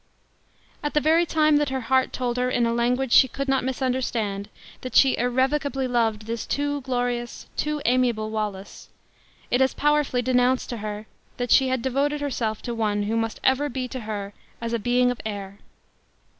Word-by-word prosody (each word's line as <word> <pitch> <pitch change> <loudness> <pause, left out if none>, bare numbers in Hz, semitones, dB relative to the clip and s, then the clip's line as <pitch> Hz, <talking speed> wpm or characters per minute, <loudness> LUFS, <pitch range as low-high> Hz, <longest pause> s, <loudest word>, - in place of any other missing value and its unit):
At 295 0 -3
the - - +5
very 325 +3 +3
time 310 -2 +3
that 295 -1 +1
her 265 0 -2
heart 260 +2 +2
told 245 -1 -2
her 250 0 +1
in 240 -1 +1
a 230 - +1
language 245 +2 0
she 260 - +7
could 275 +3 -4
not 270 -1 +1
misunderstand, 245 -6 -2 0.3
that 255 -2 -7
she 270 -1 +6
irrevocably 265 +2 0
loved 225 -3 0
this 230 +1 -4
too 285 0 -1
glorious, 245 -2 -3
too 300 -1 -2
amiable 240 -3 +1
Wallace, 210 -3 -5 0.6
it 245 - +3
as 265 - +2
powerfully 295 -4 +1
denounced 250 +1 +2
to 240 - -4
her, 210 0 -5 0.3
that 245 -1 -2
she 265 - +6
had 260 -2 -1
devoted 280 +3 0
herself 235 -7 -2
to 240 - -3
one 210 -2 0
who 215 +2 -1
must 225 -1 -2
ever 270 +3 +2
be 255 -1 -3
to 260 - -5
her 205 -3 -5 0.3
as 230 0 -4
a 235 - 0
being 245 +2 +2
of 245 - -6
air. 200 -2 -6
250 Hz, 185 wpm, -24 LUFS, 225-265 Hz, 0.6 s, she